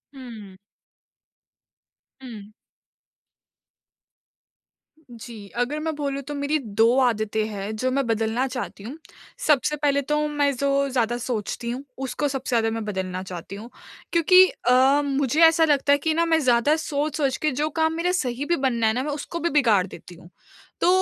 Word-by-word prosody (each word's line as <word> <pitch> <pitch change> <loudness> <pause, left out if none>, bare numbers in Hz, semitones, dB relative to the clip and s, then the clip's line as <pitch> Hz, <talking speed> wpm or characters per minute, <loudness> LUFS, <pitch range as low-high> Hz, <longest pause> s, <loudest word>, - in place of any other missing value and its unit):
हुँ। 220 -7 -11 1.6
हुँ। 215 -5 -10 2.6
जी, 225 -3 -10
अगर 265 +5 -1
मैं 320 0 -3
बोलूँ 280 -1 -3
तो 295 +2 -7
मेरी 285 +2 0
2 225 +1 +2
आदतें 220 -3 0
हैं 205 +1 -5
जो 255 +4 -1
मैं 275 +1 0
बदलना 225 +3 0
चाहती 250 -5 -6
हूँ। 255 +8 -8 0.5
सबसे 300 0 +3
पहले 280 -1 +1
तो 300 +2 -1
मैं 290 -1 +1
जो 280 +1 +1
ज़्यादा 240 -2 0
सोचती 235 -1 -4
हूँ। 255 +3 -5
उसको 270 +2 -2
सबसे 270 -2 -4
ज़्यादा 225 -1 +2
मैं - - -5
बदलना 185 -2 -4
चाहती 180 +1 -8
हूँ 220 +4 -10 0.4
क्योंकि 365 +3 +6 0.2
अ, 265 +3 +5
मुझे 280 +2 0
ऐसा 325 0 +5
लगता 285 -2 +2
है 285 - +4
कि 315 +2 -1
ना 335 +1 +1
मैं 325 -1 +2
ज़्यादा 255 +2 +3
सोच-सोच 290 -3 -2
के 305 - +2
जो 300 +4 -1
काम 320 +1 0
मेरा 335 +2 0
सही 275 -6 -2
भी 345 - +1
बनना 245 -6 0
है 220 - +2
ना 255 +3 -2
मैं 300 - -3
उसको 295 +3 -5
भी 340 +1 0
बिगाड़ 230 - +3
देती 175 0 -12
हूँ। 170 +1 -16 0.5
तो - - +3
265 Hz, 165 wpm, -23 LUFS, 225-295 Hz, 2.6 s, क्योंकि